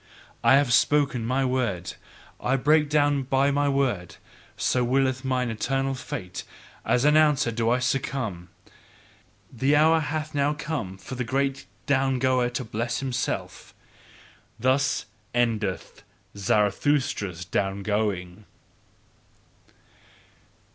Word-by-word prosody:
I - - +6
have 140 -3 +3
spoken 140 -3 +3
my 130 +2 +1
word. 120 -9 -1 0.5
I 130 - +1
break 150 +3 +3
down 145 -1 +2
by 135 +2 +1
my 145 0 +1
word: 120 -12 -1 0.4
so 125 - +1
willeth 130 +1 +1
mine 125 -2 0
eternal 135 +4 -1
fate 90 -8 -6 0.4
as 125 +2 +1
announcer 150 -5 +4
do 115 0 0
I 125 - +3
succumb! 125 -8 -2 1.0
The 135 +5 +2
hour 160 +2 +5
hath 155 0 -3
now 145 +1 +1
come 145 - -4
for 95 - -9
the 135 +2 -1 0.2
down 135 -1 +2
goer 130 -1 +2
to 125 +1 -4
bless 115 +2 -2
himself. 130 -3 -4 0.8
Thus 130 +3 +1 0.3
ENDETH 110 -5 -1 0.3
Zarathustra's 100 - 0
down 95 +3 -2
going. 105 -3 -2
130 Hz, 110 wpm, -25 LUFS, 110-140 Hz, 1.0 s, I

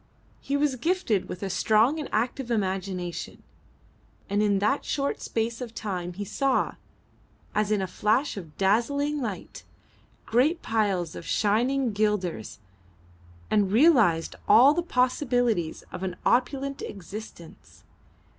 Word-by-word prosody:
He 280 - -1
was 285 -2 +1
gifted 250 - 0
with 180 - -6
a 195 - -2
strong 225 - +3
and 300 - -5
active 240 +3 -1
imagination, 190 -5 -3 0.9
and 205 +1 +2
in 205 -2 +2
that 210 +9 +1
short 280 -1 -2
space 230 +1 -2
of 235 -2 -7
time 180 -5 -4
he 205 +3 -5
saw, 265 +6 0 0.8
as 210 -1 +1
in 210 -2 +1
a - - 0
flash 215 - 0
of 165 -7 -9
dazzling 280 +9 +1
light, 215 -6 -6 0.6
great 290 +9 +2
piles 200 -7 0
of - - -7
shining 240 +4 +1
guilders, 195 - -1 0.9
and 205 -3 +2
realised 220 - +4
all 265 +5 +7
the 345 - 0
possibilities 245 - 0
of - - -7
an 185 -2 -3
opulent 275 +3 +1
existence. 195 -3 -10
220 Hz, 125 wpm, -26 LUFS, 195-265 Hz, 0.9 s, all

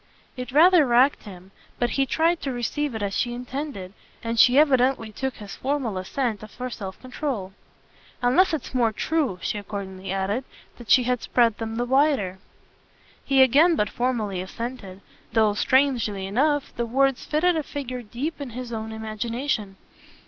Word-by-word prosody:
It 250 0 -6
rather 335 +4 +6
racked 255 +2 +3
him, 190 -2 -12 0.3
but 240 0 0
he 275 -1 +1
tried 330 +4 +1
to 275 - -2
receive 250 +2 -2
it 220 - -3
as 200 -1 -2
she 240 0 -1
intended, 250 -6 -6 0.3
and 230 0 -2
she 250 +4 +6
evidently 260 -6 +3
took 265 +4 -3
his 205 -3 -9
formal 265 -6 -2
assent 220 +2 -2
for 250 +4 -6
self 190 -4 -7
control. 255 -7 -4 0.7
"Unless 350 +11 +4
it's 310 -5 -4
more 240 -3 +2
true," 285 - -1
she 210 - -2
accordingly 195 -2 -6
added, 195 +6 -1 0.4
"that 235 -4 -12
she 255 - +6
has 250 0 0
spread 230 -3 +2
them 225 0 -4
the 240 +1 -1
wider." 260 -8 +2 0.8
He 270 -1 +5
again 305 +7 +5
but 210 -5 0
formally 220 -7 -1
assented, 200 -1 -7 0.3
though, 220 -2 +3
strangely 235 -5 +1
enough, 285 +8 0
the 235 0 -2
words 270 +2 +1
fitted 340 +3 +2
a 315 - 0
figure 255 -4 -5
deep 255 +8 -5
in 280 - -5
his 250 -2 -6
own 220 0 -4
imagination. 220 0 -3
245 Hz, 165 wpm, -24 LUFS, 210-275 Hz, 0.8 s, rather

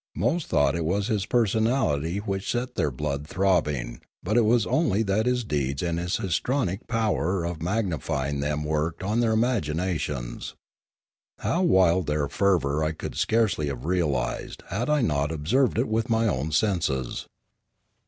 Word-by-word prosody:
Most 170 -1 0
thought 70 -1 +3
it 85 - -1
was 100 +7 0
his 105 -3 0
per 120 -2 +3
sonality 100 - 0
which 95 -2 -3
set 125 +1 -2
their 75 - 0
blood 70 +2 -3
throbbing, 75 -11 0 0.2
but 105 +4 -1
it 120 -2 +5
was 115 0 +3
only 115 - +2
that 105 +3 +1
his 125 -1 +1
deeds 70 -7 -1
and 85 -1 -1
his 90 +1 -1
histrionic 95 - -1
power 95 - 0
of 85 -2 -4
magni 95 -1 0
fying 70 +3 -2
them 75 +1 -1
worked 80 +3 -1
on 105 +4 0
their 115 -2 +2
imaginations. 80 - -1 0.8
How 175 - 0
wild 95 - +4
their 75 -1 0
fervour 80 -7 +1
I 80 +1 0
could - - -6
scarcely 110 -9 +1
have 70 -2 -5
realised 75 -8 -1
had 115 +9 -2
I 150 -1 +3
not 75 -7 +1
observed 110 - +1
it 120 - +1
with 110 +1 -1
my 115 0 +2
own 75 -3 -1
senses. 75 - 0
90 Hz, 165 wpm, -26 LUFS, 75-110 Hz, 0.8 s, it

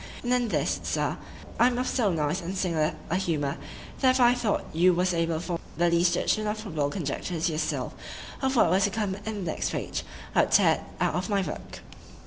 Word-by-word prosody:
And 245 0 +1
in 245 -1 +2
this, 155 -6 0
Sir, - - -1 0.4
I 240 - +7
am 245 -1 0
of 250 - 0
so 220 -7 +1
nice 160 +2 0
and 180 +3 -4
singular 165 -5 0 0.2
a 180 - +2
humour, 150 -7 -1 0.4
that 260 - +4
if - - +1
I 245 -1 +6
thought 240 -4 0
you 175 +2 +4
was 180 +1 +1
able 165 -1 0
to - - -1
form 175 -1 -3 0.2
the 170 0 +3
least 175 +1 +3
judgment 215 +4 +1
or 215 +1 -3
probable 160 -9 -2
conjecture 165 +1 -3
to 165 +1 +1
yourself, 155 +1 -2 0.5
of 265 0 +1
what 175 -8 +4
was 190 +1 +4
to - - +1
come 205 -1 -1
in 205 -1 -5
the 160 - -1
next - - -2
page,—I - - -2
would - - -1
tear - - +6
it - - -10 0.2
out - - +1
of 180 +4 -2
my 200 -2 +2
book. - - -7
185 Hz, 225 wpm, -27 LUFS, 165-215 Hz, 0.5 s, I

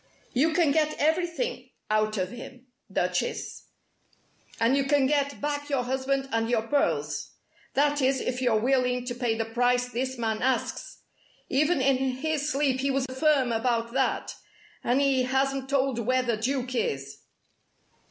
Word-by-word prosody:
"You 300 +6 +3
can 325 -3 +3
get 305 +1 +1
everything 345 +10 -1 0.2
out 215 0 +1
of 185 0 -2
him, 250 +1 -10 0.3
Duchess, - - -2 0.9
and 230 +4 +3
you 275 -1 +1
can 280 -1 +3
get 285 0 0
back 290 0 -3
your 275 -3 +1
husband 265 +2 -1
and 225 0 0
your 230 -2 +1
pearls. 285 +5 -1 0.4
That 290 +1 +2
is, 265 0 +2
if 250 0 -3
you're 235 -4 +3
willing 250 0 +1
to 245 - -3
pay 240 -2 -1
the 225 - -1
price 245 +2 +1
this 255 +2 -3
man 220 -2 -1
asks. 260 +1 -2 0.5
Even 295 +2 +2
in 265 0 +3
his 280 +3 -1
sleep 275 -2 +1
he 275 +1 0
was 270 -1 +1
firm 280 -4 +3
about 230 0 0
that, 265 0 0 0.5
and 245 +3 +2
he 275 -2 +3
hasn't 270 +1 0
told 270 -3 +1
where 255 +3 +1
the 235 -2 0
Duke 255 +2 -2
is." 140 - -2
260 Hz, 155 wpm, -27 LUFS, 245-280 Hz, 0.9 s, You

